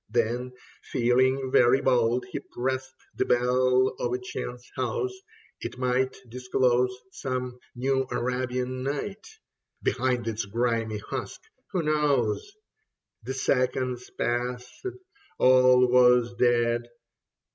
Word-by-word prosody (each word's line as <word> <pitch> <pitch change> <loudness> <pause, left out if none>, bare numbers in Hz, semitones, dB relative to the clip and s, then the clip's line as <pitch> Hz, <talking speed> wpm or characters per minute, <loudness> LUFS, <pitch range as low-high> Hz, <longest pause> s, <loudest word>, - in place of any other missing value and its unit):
Then 120 +2 -1 0.3
feeling 130 +2 +1
very 125 +2 +5
bold, 125 -1 +2
he - - -3
pressed 130 +1 -4 0.2
The - - +1
bell 125 +1 +3
of 120 - -1
a 125 - 0
chance 125 0 -6
house; 400 -5 -1 0.5
it - - -6
might 125 +1 0
Disclose 125 +1 +1 0.2
some 125 -5 -4 0.2
New 130 +1 0
Arabian 125 +1 -2
Night 145 +10 -4 0.6
Behind 125 -2 0
its 110 -2 -2
grimy 115 0 -1
husk, 105 - -6 0.3
who 185 -4 0
knows? 150 - +1 0.7
The 130 +4 -5
seconds 130 -1 0
passed; 125 - -2 0.5
all 130 0 +6
was 125 -1 +5
dead. 120 -1 +2
125 Hz, 105 wpm, -27 LUFS, 120-130 Hz, 0.7 s, all